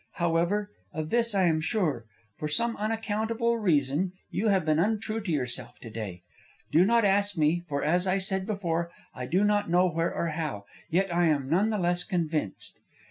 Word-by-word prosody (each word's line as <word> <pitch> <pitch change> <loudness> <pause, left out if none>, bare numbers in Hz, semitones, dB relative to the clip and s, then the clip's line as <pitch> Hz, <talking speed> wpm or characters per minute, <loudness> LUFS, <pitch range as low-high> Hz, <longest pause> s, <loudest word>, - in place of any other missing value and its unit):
However, 175 +5 0 0.2
of 155 0 -4
this 235 -2 +2
I 190 - +3
am 160 -3 +3
sure: 155 - 0 0.3
for 150 - -4
some 230 +10 0
unaccountable 225 +2 -1
reason 160 -1 +1 0.2
you 210 +5 0
have 195 -5 +3
been 155 0 +2
untrue 215 +3 0
to 200 -4 -3
yourself 125 -4 -3
to 115 - -10
day. 100 -6 -6 0.5
Do 165 - +6
not 230 +1 +4
ask 200 0 +2
me, 155 +2 +3
for, 140 -1 -1
as 180 +5 +2
I 185 +1 +2
said 190 0 -1
before, 170 -5 -1 0.2
I 125 -1 -5
do 185 +7 +2
not 205 -2 +2
know 180 +2 +4
where 165 0 0
or 170 - -1
how; 150 -11 -4 0.2
yet 185 +2 +1
I 175 0 +3
am 145 -4 +1
none 195 +6 +3
the 215 - 0
less 175 -1 +1
convinced. 160 - -2
175 Hz, 190 wpm, -28 LUFS, 155-205 Hz, 0.5 s, Do